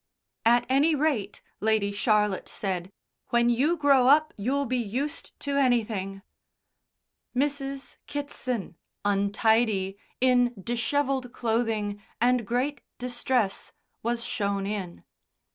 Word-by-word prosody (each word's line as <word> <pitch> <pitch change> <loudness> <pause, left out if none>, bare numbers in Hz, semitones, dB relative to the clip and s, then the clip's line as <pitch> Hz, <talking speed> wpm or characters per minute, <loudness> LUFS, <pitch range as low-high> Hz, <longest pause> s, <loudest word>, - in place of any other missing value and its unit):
"At 240 +1 +5
any 285 +5 +4
rate," 270 -9 -1 0.2
Lady 215 -1 +2
Charlotte 210 -1 +1
said, 185 -2 -3 0.4
"when 235 0 +3
you 290 +9 +2
grow 275 -4 +5
up 305 +3 +5
you'll 270 +7 0
be 255 0 0
used 250 +7 -3
to 280 -1 -1
anything." 215 -7 +1 1.1
Mrs. 275 0 -2
Kitson, 255 - -4 0.3
untidy, 200 0 +2 0.2
in 245 -1 +3
dishevelled 250 +4 -1
clothing, 220 -4 -1 0.2
and 245 -2 +2
great 260 +5 -1 0.2
distress, 245 -3 -1 0.3
was 235 +1 -1
shown 200 -4 -1
in. 195 -4 -4
240 Hz, 105 wpm, -27 LUFS, 205-270 Hz, 1.1 s, At